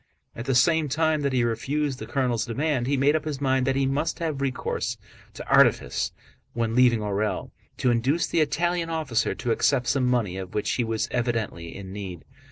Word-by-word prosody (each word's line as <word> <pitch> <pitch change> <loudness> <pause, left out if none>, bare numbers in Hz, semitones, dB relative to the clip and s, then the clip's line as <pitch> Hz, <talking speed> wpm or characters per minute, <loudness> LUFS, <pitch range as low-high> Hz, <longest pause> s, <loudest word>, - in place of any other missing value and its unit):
At 115 - -6
the 135 - +1
same 155 +4 +3
time 155 +1 +1
that 140 -1 0
he 125 -2 +2
refused 130 +4 -1
the - - -7
colonel's 125 -4 0
demand 130 +1 -1
he 140 0 +1
made 140 +3 +3
up 155 0 -1
his 150 -3 -3
mind 130 -2 +1
that 135 - +2
he 135 0 +2
must 140 +4 -1
have 155 -5 -3
recourse 135 -2 -2 0.4
to - - -8
artifice - - +3 0.4
when 115 -1 -1
leaving 120 -2 +4
Orël, 105 +1 -2 0.3
to 125 - +2
induce 130 +8 +1
the 165 - +1
Italian 170 +3 0
officer 150 -8 0
to 125 -3 -2
accept 125 +2 +2
some 125 +1 +1
money 115 -7 0
of 95 -1 -7
which 105 - 0
he 125 - 0
was 115 -1 -1
evidently 115 -9 -2
in 95 -1 -8
need. 95 -5 -7
130 Hz, 195 wpm, -25 LUFS, 115-145 Hz, 0.4 s, leaving